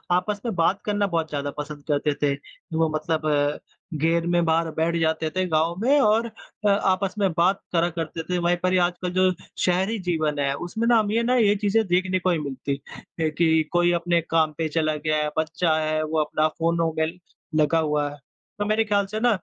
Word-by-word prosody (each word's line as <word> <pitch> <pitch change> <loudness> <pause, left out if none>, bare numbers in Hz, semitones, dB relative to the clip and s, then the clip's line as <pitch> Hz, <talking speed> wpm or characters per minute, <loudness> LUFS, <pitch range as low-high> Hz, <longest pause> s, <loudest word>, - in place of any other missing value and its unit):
आपस 205 +3 -1
में 225 - -1
बात 180 +3 +1
करना 205 -1 +1
बहुत 165 -3 -1
ज़्यादा 145 -1 -3
पसंद 150 0 -6
करते 145 0 +1
थे। 140 -1 +2 0.4
वो 160 -1 +2
मतलब 155 -2 0 0.5
घेर 165 +1 +2
में 175 0 +2
बाहर 165 0 +1
बैठ 165 +1 +1
जाते 160 0 0
थे, 185 +3 -1
गाँव 160 +1 +1
में 280 +5 +4
और 220 +1 +3 0.4
अ, - - +5
आपस 195 0 +1
में 195 -2 +3
बात 185 +3 +2
करा 170 +1 +2
करते 165 -1 -5
थे, 180 - +1
वही 175 0 +2
पर 185 0 +2
ये 185 - +4
आजकल 175 0 -1
जो 185 0 +3 0.3
शहरी 190 +5 +1
जीवन 155 -4 0
है 140 -1 +1
उसमें 180 +10 -3
न - - +4
हम 210 -1 0
ये 230 +1 +1
ना 250 +2 +2
ये 210 -4 +4
चीज़ें 210 +2 +1
देखने 185 +1 +1
को 185 +1 0
नहीं 165 - +1
मिलती 140 0 -3 0.5
कि 160 0 +3
कोई 175 0 +3
अपने 170 0 +1
काम 160 -1 +2
पे 160 -1 0
चला 155 0 0
गया 155 +1 -1
है, 150 - -1
बच्चा 160 +1 +1
है 155 0 0
वो 155 +1 -1
अपना 155 +1 +1
फ़ोनो 165 0 0
में 160 - +2 0.5
लगा 155 +1 +3
हुआ 150 -2 0
है। 145 - -10 0.4
तो 205 - 0
मेरे 215 +1 +2
ख़्याल 205 -2 +1
से 215 +2 -4
न 245 - +5
170 Hz, 210 wpm, -24 LUFS, 155-185 Hz, 0.5 s, अ